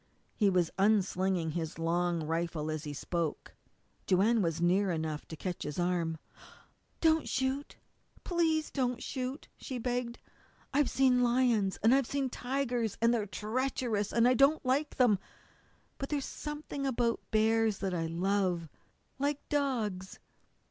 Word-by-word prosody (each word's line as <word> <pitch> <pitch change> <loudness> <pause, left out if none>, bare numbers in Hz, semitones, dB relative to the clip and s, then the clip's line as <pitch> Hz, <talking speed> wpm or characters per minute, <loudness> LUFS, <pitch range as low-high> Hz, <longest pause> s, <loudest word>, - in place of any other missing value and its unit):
He 205 -3 +3
was 180 -3 +2
unslinging 190 -4 +2
his 160 0 -4
long 170 0 0
rifle 160 -1 -2
as 155 0 -4
he 150 - -4
spoke. 165 +2 -3 0.5
Joanne 210 +5 +4
was 165 -3 0
near 185 +3 +3
enough 160 -3 -3
to 160 - -7
catch 180 +2 -5
his 150 - -4
arm. 175 -2 0 0.8
"Don't 320 -1 +3
shoot 265 +2 -1 0.5
please 325 -3 +1
don't 250 -3 -1
shoot!" 260 +3 -4
she 260 - -5
begged. 245 0 -2 0.6
"I've 285 -1 +3
seen 255 -2 +3
lions, 240 -5 +2
and 225 +3 +6
I've 270 -2 +3
seen 275 -2 -1
tigers 245 -5 -2
and 230 +1 +4
they're 215 -3 0
treacherous 220 -1 -1
and 235 +1 +4
I 250 - +5
don't 275 +4 +4
like 280 +4 +1
them. 235 -7 +4 0.8
But 275 - -4
there's 285 -3 -1
something 295 -2 -5
about 235 -2 +1
bears 220 -1 +2
that 190 -2 -2
I 165 -2 -1
love, 180 -1 0 0.5
like 285 +1 -1
dogs. 225 -10 -1
220 Hz, 140 wpm, -31 LUFS, 175-260 Hz, 0.8 s, and